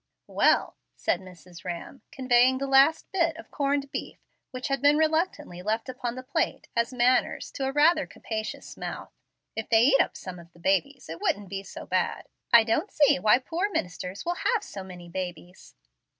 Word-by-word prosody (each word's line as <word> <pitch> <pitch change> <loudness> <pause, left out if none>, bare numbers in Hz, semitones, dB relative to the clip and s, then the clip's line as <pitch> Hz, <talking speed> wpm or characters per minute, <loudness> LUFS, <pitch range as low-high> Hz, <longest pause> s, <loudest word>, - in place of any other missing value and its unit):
"Well," - - +2 0.2
said - - 0
Mrs. 180 -1 -14
Rhamm, 175 +9 -6
conveying 255 0 +3
the 275 - -2
last 275 +4 +5
bit 335 -4 +1
of 330 - -12
corned 280 -1 -1
beef, - - -5 0.3
which 255 +2 -5
had 275 -2 -1
been 290 +1 +5
reluctantly 315 - 0
left 220 +4 -1
upon 245 -2 -4
the 255 - -7
plate 265 +3 -2
as 235 +1 +1
"manners," 250 0 +1
to 270 - -3
a 265 - 0
rather 305 +3 +4
capacious 220 -1 -6
mouth, - - -6 0.4
"if 225 - -4
they 225 -1 +5
would - - +6
eat 270 - +6
up - - -2
some 180 -2 -8
of 170 0 -15
the 170 - -19
babies 195 +10 0
it 165 +1 -8
wouldn't 200 -2 -1
be 195 0 -4
so 195 - -9
bad. - - -1 0.3
I 235 -2 +8
don't 245 - 0
see 290 -2 +4
why 215 0 +5
poor 335 +10 -2
ministers 180 - -4
will 345 +1 -1 0.2
have 445 -3 0
so 195 - -8
many 180 -2 -10
babies." 180 0 -7
250 Hz, 190 wpm, -27 LUFS, 190-285 Hz, 0.4 s, I